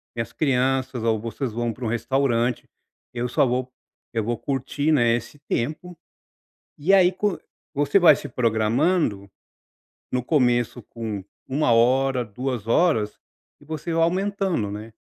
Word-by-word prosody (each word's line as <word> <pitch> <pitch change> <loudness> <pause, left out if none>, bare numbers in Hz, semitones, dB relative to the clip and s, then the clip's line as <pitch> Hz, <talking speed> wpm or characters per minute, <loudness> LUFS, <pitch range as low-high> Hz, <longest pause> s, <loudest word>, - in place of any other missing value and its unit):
minhas 115 -1 -3
crianças 130 -3 0
ou 110 -1 +1
vocês 115 +3 -4
vão 120 +1 -2
para 125 - -10
um - - 0
restaurante, 120 0 0 0.4
eu 120 0 -2
só 125 - +2
vou 125 0 -1 0.4
eu 115 -2 0
vou 120 +2 -2
curtir, 140 +2 -1
né, 120 -5 +4
esse 120 +5 -7
tempo 155 +6 -3 0.8
e, 170 +7 +2
aí, 185 -2 +5
co 195 0 -1 0.4
você 145 +7 +3
vai 175 - +7
se - - -7
programando, 115 - +1 0.8
no 125 - 0
começo 120 -4 +1
com 110 -3 -6 0.2
1 140 0 +1
hora, 125 +2 +3
2 120 +1 -4
horas 115 -6 +2 0.4
e - - -17
você 160 +2 -4
vai 165 0 +3
aumentando, 190 - 0
né, 105 +2 -7
125 Hz, 145 wpm, -24 LUFS, 115-150 Hz, 0.8 s, vai